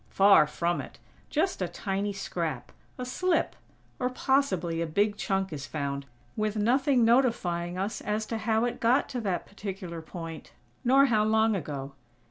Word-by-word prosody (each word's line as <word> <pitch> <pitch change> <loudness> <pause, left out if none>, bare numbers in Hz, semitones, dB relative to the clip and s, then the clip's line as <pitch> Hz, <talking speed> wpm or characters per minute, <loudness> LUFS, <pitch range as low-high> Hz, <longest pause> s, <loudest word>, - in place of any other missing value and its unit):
Far 195 -6 +6
from 170 +3 -1
it! - - -11 0.3
Just 330 - 0
a 180 - +1
tiny 195 +3 -2
scrap; 165 -8 -4 0.3
a 250 - -4
slip; 350 +7 0 0.4
or, 250 - +1
possibly 190 - +1
a 170 - -1
big 205 +6 +1
chunk 195 -3 -1
is 145 -2 -6
found, 140 -2 -3 0.3
with 215 0 -1
nothing 250 +3 +3
notifying 180 -8 +2
us 195 +3 -2
as 210 +1 -1
to 225 0 -3
how 225 +1 +1
it 245 - -3
got 240 +4 +3
to 245 - -3
that 190 -5 -2
particular 190 -4 -6
point, 165 -1 -8 0.3
nor 270 +2 +6
how 220 -5 +3
long 220 0 +3
ago. 140 -5 -5
205 Hz, 160 wpm, -28 LUFS, 170-235 Hz, 0.4 s, Far